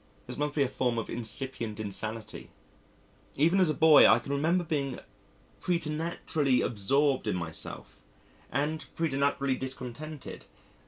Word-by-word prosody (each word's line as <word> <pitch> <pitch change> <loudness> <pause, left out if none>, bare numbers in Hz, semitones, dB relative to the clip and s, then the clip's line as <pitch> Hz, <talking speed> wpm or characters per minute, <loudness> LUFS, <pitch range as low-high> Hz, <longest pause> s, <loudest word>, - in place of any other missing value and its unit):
This - - -6
must 150 0 -2
be 145 - +3
a - - +1
form 125 -2 -1
of 115 - -3
incipient 115 -1 -3
insanity. 110 +2 -5 0.9
Even 165 +7 +3
as 185 -4 +4
a - - +2
boy, 160 -2 +8
I 110 - +7
can 120 +4 -6
remember 165 +6 +2
being 140 -5 -2 0.6
preternaturally 155 -5 0
absorbed 135 +6 +1
in - - +1
myself 85 -3 -7 0.5
and 155 +2 -1
preternaturally 140 -3 +1
discontented. 130 +3 -7
140 Hz, 125 wpm, -29 LUFS, 120-155 Hz, 0.9 s, boy